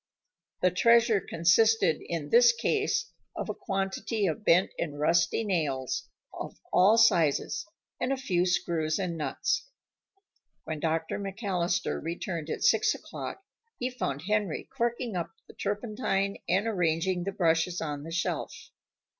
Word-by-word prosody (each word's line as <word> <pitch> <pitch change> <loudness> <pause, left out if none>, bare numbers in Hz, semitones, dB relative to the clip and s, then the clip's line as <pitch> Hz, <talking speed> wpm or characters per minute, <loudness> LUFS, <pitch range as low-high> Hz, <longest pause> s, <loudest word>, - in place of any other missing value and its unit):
The 180 - +5
treasure 230 +2 +4
consisted 175 +1 +3
in 160 -4 -4
this 240 0 +7
case 415 - 0 0.2
of - - -4
a - - -1
quantity 195 +1 -2
of 170 +3 -2
bent 180 -1 +4
and 145 -3 -3
rusty 165 +7 +2
nails 150 - -1 0.2
of - - -7
all 200 +5 +6
sizes, 205 -1 +3 0.3
and 250 +2 -1
a 275 - +1
few 185 -9 0
screws 170 -3 0
and 180 -3 -2
nuts. 160 - -2 0.9
When 155 -1 -4
Dr. 160 +3 -1
McAllister 195 -3 -1
returned 165 -1 -4
at - - -3
six - - +4
o'clock 390 - -7 0.3
he 250 +1 -2
found 145 - -3
Henry 210 -3 -1
corking 235 -3 -1
up 170 -2 -4
the - - -14
turpentine 205 -2 -2
and 195 +4 +2
arranging 180 -3 0
the 195 - -2
brushes 170 -2 +1
on 145 -3 -4
the 160 - -8
shelf. 170 +1 -3
185 Hz, 140 wpm, -28 LUFS, 165-220 Hz, 0.9 s, this